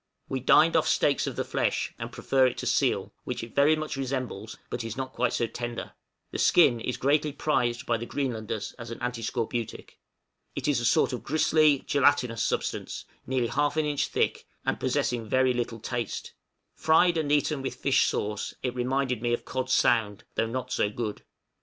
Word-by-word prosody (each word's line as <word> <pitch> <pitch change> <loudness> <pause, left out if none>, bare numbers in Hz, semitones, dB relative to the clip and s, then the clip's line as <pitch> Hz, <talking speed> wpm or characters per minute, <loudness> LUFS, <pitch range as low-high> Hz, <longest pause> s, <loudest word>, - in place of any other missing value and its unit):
We - - -2
dined - - +5
off - - +3
steaks - - +2
of - - -3
the - - -1
flesh, - - -1
and - - -5
prefer 130 -1 +2
it 125 - -3
to - - -4
seal, - - +1
which - - -4
it 115 - -9
very 145 +3 +5
much 155 -1 -4
resembles, 130 -5 -4
but 120 - -3
it - - -4
is 115 - -6
not 130 -1 -4
quite 125 0 +1
so 120 - +1
tender; 120 +1 -5 0.4
the - - -4
skin 135 -9 +5
is 125 +2 -3
greatly 145 +2 +2
prized 125 -4 0
by 115 - +1
the 120 +1 -6
Greenlanders 110 -6 -3
as 120 -1 -7
an 115 - -6
antiscorbutic; 120 -1 -4 0.6
it - - -3
is 145 -4 +2
a 120 - -2
sort 120 - +3
of 125 - -3
gristly 155 -1 +3
gelatinous 125 -5 +2
substance, - - -2 0.2
nearly 125 -3 0
half 145 +1 0
an 155 - +2
inch 145 -2 0
thick, - - -1 0.2
and - - 0
possessing 115 -3 -1
very 130 +1 +3
little 120 -1 -3
taste; 120 +1 -4 0.4
fried 165 +2 +4
and 155 -3 0
eaten 150 -1 +2
with 135 - -4
fish 135 -2 +2
sauce, 105 0 -2
it 125 -2 -1
reminded 125 -1 -1
me 120 0 0
of 120 - -2
cod 130 0 -3
sound, 110 -5 +2
though 115 - 0
not 125 +2 -4
so 105 - +1
good. 105 -1 -4
125 Hz, 190 wpm, -27 LUFS, 115-140 Hz, 0.6 s, dined